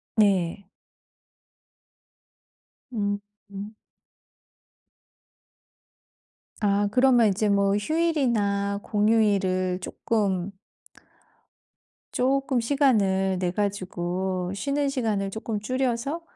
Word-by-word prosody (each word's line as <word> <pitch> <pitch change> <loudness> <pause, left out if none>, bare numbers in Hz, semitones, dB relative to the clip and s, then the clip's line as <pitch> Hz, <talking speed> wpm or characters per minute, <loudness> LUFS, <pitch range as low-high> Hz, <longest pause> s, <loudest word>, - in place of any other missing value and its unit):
네. 195 -3 +2 2.3
음 205 -2 -1 0.3
음. 200 +2 -7 2.9
아 205 -1 +2
그러면 250 -1 +5
이제 205 +2 0
뭐 200 0 +3
휴일이나 210 -8 0
공휴일을 200 -4 +1
쪼끔 195 -3 -1 1.6
쪼끔 270 0 +1
시간을 210 -8 +2
내 180 -1 0
가지고 185 -2 -2
쉬는 280 +6 -1
시간을 220 -7 -1
쪼끔 220 0 -4
줄여서 255 +6 -1
205 Hz, 145 characters per minute, -25 LUFS, 195-240 Hz, 2.9 s, 그러면